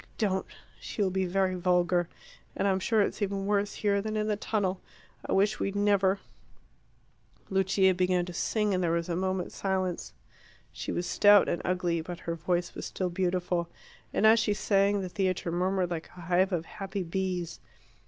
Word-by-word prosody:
Don't. 190 -3 0 0.3
She 210 - -3
will 190 - +1
be 190 0 0
very 190 +1 +1
vulgar. 180 -1 +1 0.5
And - - 0
I'm 190 -1 +2
sure 220 +3 +2
it's 205 - -1
even 195 -1 -1
worse 205 0 0
here 200 -1 +1
than 215 +1 -3
in 210 - 0
the 210 - +1
tunnel. 200 -3 -1 0.4
I - - -5
wish 205 +2 +2
we'd 195 - -2
never 200 -1 +3 0.7
" - - -35
Lucia 190 0 +3
began 180 -1 +1
to 180 - -8
sing, 210 +2 0
and 185 -1 0
there 170 - +1
was 170 +1 -1
a 170 - 0
moment's 185 0 -2
silence. 185 -2 -2 0.6
She - - -5
was 175 - -2
stout 205 0 +6
and 170 - -1
ugly; 180 -2 0
but 175 +1 -7
her 170 - -3
voice 175 +1 -1
was - - -6
still 185 -2 -3
beautiful, 180 -1 -1 0.4
and - - +1
as 220 +1 +7
she 215 -2 +1
sang 200 0 +2
the 185 - -4
theatre 185 -2 -1
murmured 180 +1 0
like 165 -2 -4
a - - -9
hive 180 +3 +2
of 170 -3 -1
happy 195 +1 -5
bees. 180 -1 -3
190 Hz, 185 wpm, -29 LUFS, 180-200 Hz, 0.7 s, as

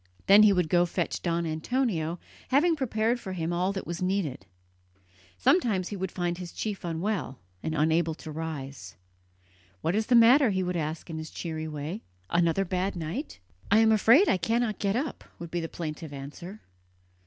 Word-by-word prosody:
Then 200 +2 +8
he 215 -1 +7
would 180 -4 +2
go 175 +2 +4
to 175 - -4
fetch - - -2
Don 170 -1 -1
Antonio, 165 0 -1 0.3
having 320 +6 +3
prepared 235 -3 0
for 190 -5 -6
him 170 -1 -2
all 180 +3 +1
that 195 -1 -5
was 170 +1 -5
needed. 180 - -2 0.9
Sometimes 200 - +2
he 205 - -4
would 190 -1 -3
find 175 -1 -2
his 175 -2 -7
chief 210 -3 -4
unwell 170 -3 -2 0.2
and 160 - -3
unable 160 +1 +2
to 155 - -9
rise. 150 -4 -6 0.9
"What 165 - 0
is 215 +2 0
the 250 - +4
matter?" 245 +3 +7
he 190 -2 0
would 180 0 -2
ask 160 +1 -3
in 160 - -4
his 155 -1 -7
cheery 160 -2 -5
way 155 +7 -5 0.3
"another 170 +3 +2
bad 185 +2 -1
night?" 175 - -5 0.3
"I 210 - +5
am 220 0 +5
afraid 230 - +6
I - - +3
cannot 225 +3 0
get 200 0 0
up," 275 +2 -3
would 170 -1 -8
be 175 - -1
the 165 -1 -4
plaintive 155 -2 -6
answer. 150 +9 -9
180 Hz, 185 wpm, -28 LUFS, 160-215 Hz, 0.9 s, Then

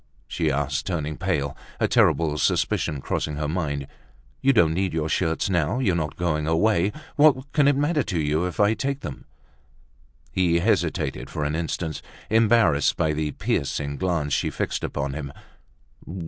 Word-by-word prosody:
she 80 - -1
asked, 70 -1 -1
turning 80 -4 -2
pale, 75 -8 -1 0.2
a - - +2
terrible 80 -3 +3
suspicion 75 -1 0
crossing 75 +2 -2
her 75 0 -2
mind. 75 -4 -2 0.6
"You 135 - +5
don't 90 -10 +4
need 95 0 -1
your 80 -1 -1
shirts 80 +1 0
now, 85 +2 +1
you're 110 -9 +1
not 80 -3 -2
going 75 -3 -1
away. 90 +3 +2 0.3
What 140 -3 +4
can 145 -2 +3
it 145 - +4
matter 150 +2 +1
to 90 -9 -2
you 75 +3 +1
if 90 - -7
I 105 +1 +4
take 135 +5 -2
them?" 70 - -7 1.1
He 90 -2 +2
hesitated 85 - 0
for 75 - -3
an 75 +1 -1
instant, 80 -1 -3 0.3
embarrassed 110 -9 +4
by 80 -1 +1
the 75 0 -1
piercing 70 0 -2
glance 85 -6 -1
she - - +1
fixed - - -3
upon 70 -1 -3
him. 70 -1 -5
80 Hz, 160 wpm, -24 LUFS, 75-105 Hz, 1.1 s, You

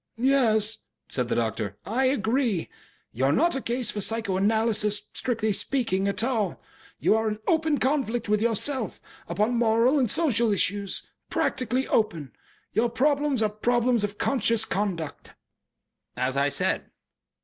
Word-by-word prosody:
"Yes," 230 -4 +2 0.3
said 125 -2 -1
the - - -1
doctor. 110 -3 -2
"I 250 +5 0
agree. 240 - 0 0.4
You 130 +3 -1
are 135 - +3
not 335 - +2
a 270 - -2
case 240 -1 -1
for 205 - -4
psychoanalysis, 215 0 +1
strictly 220 -4 -1
speaking, 200 -5 0
at 200 +3 0
all. 230 -5 -1 0.4
You - - +3
are 220 0 +1
in 210 - -3
open 320 -2 +2
conflict 255 -5 0
with 210 0 +1
yourself, 235 +2 0 0.3
upon 215 +4 0
moral 235 +4 +3
and 250 -4 +1
social 235 -6 +2
issues. 200 0 -1 0.2
Practically 255 +1 -1
open. 165 - 0 0.4
Your 230 +4 +2
problems 280 0 +1
are 215 - +2
problems 240 +2 +1
of 205 0 -3
conscious 230 -4 +1
conduct." 190 -8 -4 0.8
"As 130 +1 -1
I 140 +1 +2
said." - - 0
220 Hz, 140 wpm, -26 LUFS, 205-250 Hz, 0.8 s, are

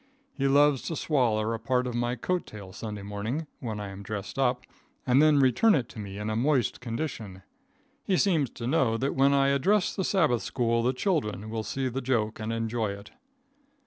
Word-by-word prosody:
He 135 -1 0
loves 145 -1 +4
to 165 - -2
swaller 115 -8 +1
a 115 - -3
part 125 +2 0
of 125 - -3
my 120 +1 -1
coat 180 +9 -2
tail 100 -3 -10
Sunday 105 0 -6
morning, 105 +10 -3
when 110 -4 -4
I 100 -1 -5
am 95 0 -9
dressed 105 +5 -6
up, 125 -2 +1 0.4
and 130 +2 +4
then 155 -1 +5
return 140 - +4
it 125 -5 -1
to - - -10
me 100 -1 -7
in 105 +1 -4
a 110 - -1
moist 130 +1 +1
condition. 115 -6 -5 0.6
He 190 - +1
seems 165 - +2
to 115 - -8
know 125 -4 +2
that 135 +4 -1
when 135 +1 +4
I 140 0 +3
address 180 +9 +2
the 190 - -1
sabbath 160 - +2
school 115 -2 0
the 125 +2 +2
children 110 - -2
will 110 -1 -2
see 130 +5 -2
the 130 +2 -3
joke 115 -4 -1
and 110 +1 -3
enjoy 115 -2 -1
it. 100 +1 -11
120 Hz, 205 wpm, -27 LUFS, 110-140 Hz, 0.6 s, then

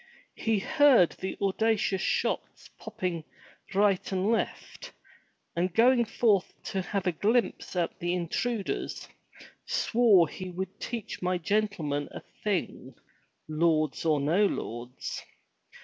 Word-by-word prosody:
He 225 -1 +1
heard 250 - +5
the 190 - -6
audacious 200 -1 +1
shots - - -2
popping 175 -3 -4 0.5
right 200 -2 +2
and 190 +3 +1
left, 365 - -3 0.6
and 180 +2 0
going 240 +1 +5
forth 215 -3 +2 0.2
to 190 - -1
have 195 +1 -3
a 180 - +3
glimpse 220 +5 0
at 175 -2 -1
the 175 +1 -1
intruders, 200 +5 -2 0.6
swore 220 -8 +4
he 185 +4 -7
would 185 +1 -6
teach 230 -3 -5
my 180 0 +1
gentlemen 175 -7 -1
a - - -8 0.2
thing, 205 -4 -2 0.5
lords 155 -1 +1
or 155 -3 +2
no 170 +9 +3
lords. 120 - -5
190 Hz, 115 wpm, -28 LUFS, 170-215 Hz, 0.6 s, heard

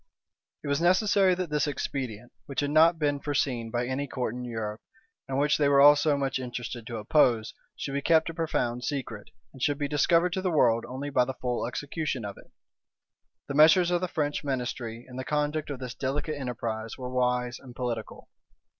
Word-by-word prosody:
It - - -6
was 140 +2 0
necessary 190 +1 +4
that 180 -3 -4
this 150 -1 +1
expedient, 125 -5 -4 0.2
which 140 - -2
had 145 0 -1
not 165 +2 +5
been 145 -2 0
foreseen 130 -5 -1
by 120 +1 -1
any 130 +3 -2
court 125 -4 -3
in 125 0 -6
Europe, 110 -3 -4 0.5
and 135 - -1
which 145 +2 +2
they 145 -1 +4
were 140 -1 +5
all 145 +1 +9
so 145 0 +2
much 135 -1 -1
interested 120 -2 -6
to 115 - -5
oppose, 115 -1 +2 0.2
should 135 - -5
be 140 - -1
kept 160 +2 +3
a - - -12
profound 125 -7 -1
secret, 125 -8 -4 0.2
and 135 - -13
should 145 +2 +1
be 145 -1 -1
discovered 170 +5 +2
to 190 - -1
the 185 - 0
world 115 -8 +3
only 135 +4 -5
by 125 -2 +4
the 130 +1 -5
full 125 -2 -2
execution 140 -1 -3
of 100 -1 -7
it. - - -18 1.0
The - - -4
measures 165 +4 +6
of 175 -1 +1
the 185 - 0
French 150 -4 -2
ministry 125 -4 -4
in 125 0 -10
the 130 - -3
conduct 150 +3 -1
of 140 - -4
this 125 -2 -6
delicate 140 +3 -2
enterprise 115 -4 -4
were 125 -1 -6
wise 125 -1 0
and 125 -2 -13
political. 120 -3 -5
135 Hz, 200 wpm, -28 LUFS, 125-150 Hz, 1.0 s, all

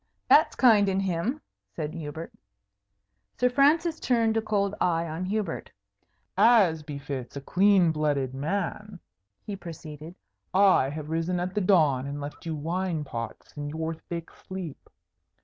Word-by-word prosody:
"That's 310 - +5
kind 215 -6 +5
in 190 0 +1
him," 195 - -1 0.3
said 155 -1 -4
Hubert. 160 0 -7 1.0
Sir 250 0 +2
Francis 310 +5 +3
turned 230 -3 +2
a 225 - +2
cold 205 -2 0
eye 165 -1 +2
on 165 +3 -4
Hubert. 210 +2 -3 0.7
"As 200 -9 +5
befits 140 -4 -6
a - - -2
clean 185 +2 +4
blooded 145 -4 0
man," 190 +6 -3 0.5
he 205 - -4
proceeded, 160 -2 -9 0.4
"I 190 -8 +5
have 150 +1 -6
risen 165 +2 0
at 180 +1 -3
the 210 - 0
dawn 155 -9 +3
and 145 +1 -5
left 145 +3 -7
you 160 - -2
wine 165 +1 -2
pots 115 -5 -7
in 145 0 -4
your 160 +2 -3
thick 165 +1 -7
sleep. 185 -6 -8
170 Hz, 145 wpm, -27 LUFS, 150-200 Hz, 1.0 s, That's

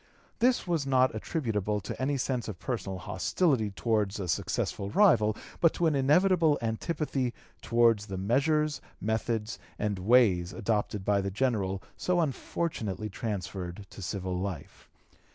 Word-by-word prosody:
This 245 +1 +3
was 165 -6 -1
not 130 -1 +3
attributable 105 - -1
to - - -6
any 140 +2 +1
sense 125 -2 -1
of 105 -5 -5
personal 105 -5 -3
hostility 110 - 0
towards 105 0 0
a 95 - -3
successful 100 +3 -1
rival, 110 - +4 0.2
but 165 - +4
to 175 - +1
an 160 - +3
inevitable 155 +3 +4
antipathy 130 +2 -2 0.3
towards 115 -3 +3
the 95 - -5
measures, 145 +9 +1 0.2
methods, 110 0 -2 0.2
and 105 -2 -1
ways 95 -4 +4
adopted 105 -3 -1
by 100 -1 +3
the 100 - -2
General 95 -4 -1
so 180 -1 +1
unfortunately 120 - -2
transferred 100 -3 -5
to - - -10
civil 95 -1 -3
life. 90 -3 -6
110 Hz, 135 wpm, -29 LUFS, 100-140 Hz, 0.3 s, rival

